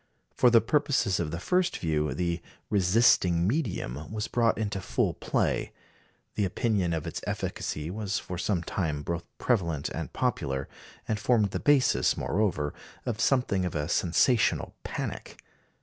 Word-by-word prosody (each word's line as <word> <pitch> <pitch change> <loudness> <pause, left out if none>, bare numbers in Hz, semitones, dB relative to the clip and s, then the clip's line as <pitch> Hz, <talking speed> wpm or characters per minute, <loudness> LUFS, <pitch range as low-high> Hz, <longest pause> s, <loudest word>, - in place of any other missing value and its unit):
For 125 - +5
the 115 -1 +6
purposes 130 - +1
of 85 -3 -1
the 85 +2 -4
first 180 - +1
view 75 -2 0
the 85 -1 -1 0.3
"resisting 90 -3 +4
medium" 100 - -2
was 110 0 -2
brought 115 -1 +2
into 100 -3 -2
full - - 0
play; - - -1 0.6
the 105 - 0
opinion 100 -2 0
of 80 -2 -2
its - - -5
efficacy 75 +3 -3
was 105 +1 -2
for 90 -1 -5
some 95 -3 0
time 80 -5 -2
both 85 +2 -3
prevalent 85 - 0
and - - -5
popular, 70 - -1 0.4
and 110 - -1
formed 105 -2 +2
the - - -2
basis, 145 -3 +3
moreover, 90 -8 0 0.3
of 115 -2 -2
something 125 -8 +2
of 90 - -3
a 75 -1 -1
sensational 95 +7 +2
panic. - - -5
95 Hz, 150 wpm, -28 LUFS, 85-115 Hz, 0.6 s, the